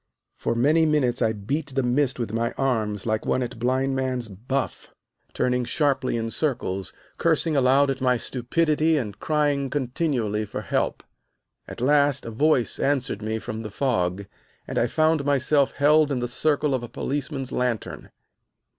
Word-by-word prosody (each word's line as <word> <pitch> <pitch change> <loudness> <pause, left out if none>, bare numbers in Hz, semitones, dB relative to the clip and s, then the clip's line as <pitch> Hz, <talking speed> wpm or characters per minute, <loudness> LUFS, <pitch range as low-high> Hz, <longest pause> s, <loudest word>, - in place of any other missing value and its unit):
For 115 - -2
many 155 +7 +3
minutes 130 -5 +1
I 110 - +3
beat 135 +7 -4
the 135 - +2
mist 130 +2 +1
with 115 -3 -4
my 115 +1 -1
arms 110 -6 -1
like 110 -1 0
one 130 - 0
at 120 - -6
blind 130 +2 +1
man's 130 -3 -1
buff, 125 +7 -4 0.4
turning 125 0 0
sharply 135 -3 0
in 115 0 -3
circles, 110 - -2 0.3
cursing 160 -1 +2
aloud 135 +1 +4
at 135 0 -5
my 125 -1 +3
stupidity 155 +6 +1
and 105 -7 -4
crying 145 -3 0
continually 125 -5 -1
for 105 - -5
help. - - -1 0.6
At - - -8
last 145 +1 +3
a 115 - -5
voice 135 +1 +1
answered 135 -6 0
me 110 +1 -2
from 110 0 -5
the 110 - -6
fog, 100 -6 -1 0.4
and - - -1
I 120 - +2
found 155 +2 +2
myself 140 0 +2
held 150 +1 +4
in 135 - 0
the 120 0 -1
circle 145 +3 +1
of 130 - 0
a 120 - -7
policeman's 135 -1 -3
lantern. 125 -4 -2
130 Hz, 165 wpm, -24 LUFS, 115-145 Hz, 0.6 s, aloud